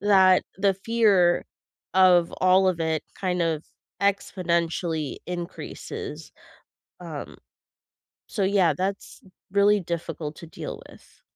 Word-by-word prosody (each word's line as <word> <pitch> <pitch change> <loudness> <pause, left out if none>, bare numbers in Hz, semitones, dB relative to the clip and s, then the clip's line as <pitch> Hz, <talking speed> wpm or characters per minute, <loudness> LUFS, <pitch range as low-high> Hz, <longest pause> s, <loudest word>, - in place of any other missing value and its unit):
that 190 -2 +5
the 195 0 +3
fear 195 -4 +3 0.5
of 180 -2 +5
all 185 +1 +5
of 180 -2 0
it 160 -1 0 0.2
kind 180 -2 0
of 160 -2 -1 0.4
exponentially 170 -5 0
increases. 175 0 -6 0.7
Um, - - -8 0.9
so 210 - -4
yeah, 190 -5 +3
that's 195 +5 -4 0.3
really 200 +1 +4
difficult 165 -3 -5
to 170 - -10
deal - - -7
with. - - -19
185 Hz, 105 wpm, -25 LUFS, 170-195 Hz, 0.9 s, that